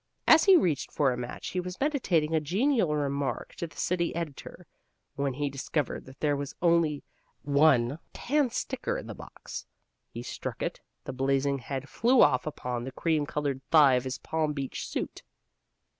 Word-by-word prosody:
As 320 - +7
he 390 -2 +8
reached 150 - 0
for 135 -4 +2
a - - -3
match 125 0 -6
he 185 - -2
was 180 +1 -5
meditating 185 - +1
a 160 - +4
genial 190 - +1
remark 140 -3 -2
to 170 - -3
the 160 - -18
city 170 -2 0
editor, 170 +2 -6 0.5
when 140 -2 -2
he 145 +1 -1
discovered 140 0 -3
that 130 - -13
there 145 -2 +2
was 140 -1 -5
only 170 -4 +2 0.4
one 140 -2 +3
tandsticker 275 - -1
in - - -7
the - - -6
box. - - -9 0.4
He - - -7
struck - - -5
it, - - -3
and - - -42 0.2
the 130 - -5
blazing 135 +1 +1
head 135 +2 -5
flew 245 - +4
off 135 0 +3
upon 125 -5 -4
the 130 - -5
cream 155 -2 0
colored 145 -3 -2
thigh 150 -5 +7
of 125 0 +1
his 130 0 -3
Palm 155 -1 -1
Beach 135 -3 -4
suit. - - -4
150 Hz, 175 wpm, -28 LUFS, 135-170 Hz, 0.5 s, he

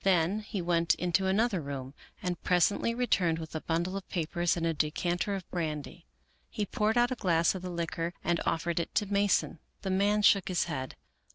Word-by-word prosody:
Then 185 +1 +3
he 210 -3 -4
went 170 -1 +2
into 180 +2 +1
another 200 -1 +2
room 135 -2 -6 0.3
and 175 -2 -2
presently 185 +6 +2
returned 185 -9 +2
with 160 -1 -7
a 160 - -3
bundle 170 +3 -1
of 195 -1 -6
papers 175 0 0
and 165 - -1
a 165 - +1
de 150 0 +1
canter 175 +5 -1
of 190 -2 -6
brandy. 160 -1 -4 0.4
He 210 - -2
poured 215 +2 0
out 240 +1 +4
a - - 0
glass 170 -7 +2
of 190 - -6
the 180 - -5
liquor 170 0 -3
and 170 -1 +1
offered 170 +1 0
it 170 - -4
to 210 - +2
Mason, 200 -4 +2 0.2
The 190 - -1
man 205 +2 +2
shook 195 -2 +5
his 180 -2 +1
head. 135 -6 -4
175 Hz, 200 wpm, -30 LUFS, 165-195 Hz, 0.4 s, shook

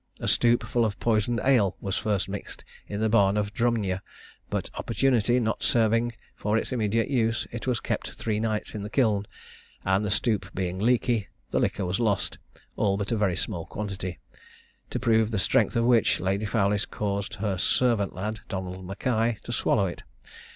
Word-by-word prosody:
A - - -3
stoup 120 0 +3
full 120 - +1
of 105 -3 -1
poisoned 115 +1 +1
ale 120 -8 +3
was 95 0 -2
first 100 -3 0
mixed 100 +1 -7 0.2
in 105 +1 -4
the 110 - +3
barn 100 -2 +4
of 105 -1 -1
Drumnyer, 110 -6 0 0.5
but - - -3
opportunity 125 -2 +2
not 110 -2 -1
serving 115 +1 +3 0.2
for 105 +1 0
its 115 - -2
immediate 115 -2 +1
use, 115 -5 +1
it 120 +2 -6
was 125 -3 +1
kept - - -3
three 110 -2 -2
nights 110 -1 -1
in 105 - -4
the 105 - -5
kiln, 105 -5 +2 0.6
and 95 +2 +2
the 105 - -1
stoup 105 +1 0
being 95 0 -2
leaky, 120 -1 +2 0.2
the - - +2
liquor 100 - 0
was 90 +4 -1
lost, 105 -4 0 0.4
all 100 -2 +1
but 100 +2 -3
a - - +2
very 100 -5 +1
small 85 -2 -3
quantity; 95 -3 -5 0.7
to - - -2
prove 110 -2 +3
the 110 - -1
strength 95 - +2
of 115 0 +2
which, 120 -3 +4
Lady 95 +3 0
Fowlis 100 -1 +1
caused 100 -1 -3
her 100 -3 -2
servant 115 -3 +2
lad, 105 +3 -3
Donald 95 -1 -4
Mackay, 110 +4 0
to - - -6
swallow 105 -3 +2
it. 90 - -5
105 Hz, 180 wpm, -27 LUFS, 100-115 Hz, 0.7 s, barn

